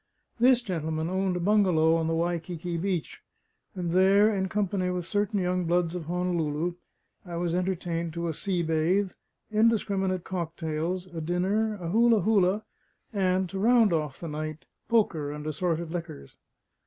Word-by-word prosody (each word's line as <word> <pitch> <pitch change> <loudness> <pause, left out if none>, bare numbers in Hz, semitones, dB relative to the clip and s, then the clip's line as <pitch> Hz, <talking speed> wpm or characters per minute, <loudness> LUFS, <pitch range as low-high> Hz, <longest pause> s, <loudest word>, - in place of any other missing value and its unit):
This 250 0 +5
gentleman 160 -4 -2
owned 190 -1 0
a - - -1
bungalow 175 -5 +3
on 165 -1 0
the 165 - 0
Waikiki 170 0 -2
beach; 175 -3 -2 0.5
and 175 -3 -2
there 195 +4 +5
in 190 -1 -1
company 195 -2 0
with 180 -1 -2
certain 205 +2 0
young 180 -1 0
bloods 170 0 +1
of 175 -3 -5
Honolulu, 170 -1 -1 0.5
I 175 -2 -7
was 170 0 -1
entertained 175 -2 -1
to 170 0 -3
a 165 - -1
sea 180 +2 -1
bathe, 170 +5 +1 0.4
indiscriminate 200 -4 +1
cocktails, 170 0 -3
a 170 -3 -7
dinner, 195 +6 0
a 175 -4 -5
hula 230 +2 +4
hula, 200 0 +2 0.5
and 190 -2 +1
(to 195 - -4
round 225 -2 +4
off 150 -4 -2
the 170 - -6
night), 155 +2 -5 0.2
poker 170 -11 +1
and 150 0 -7
assorted 165 +1 -2
liquors. 165 - -7
180 Hz, 155 wpm, -27 LUFS, 165-195 Hz, 0.5 s, This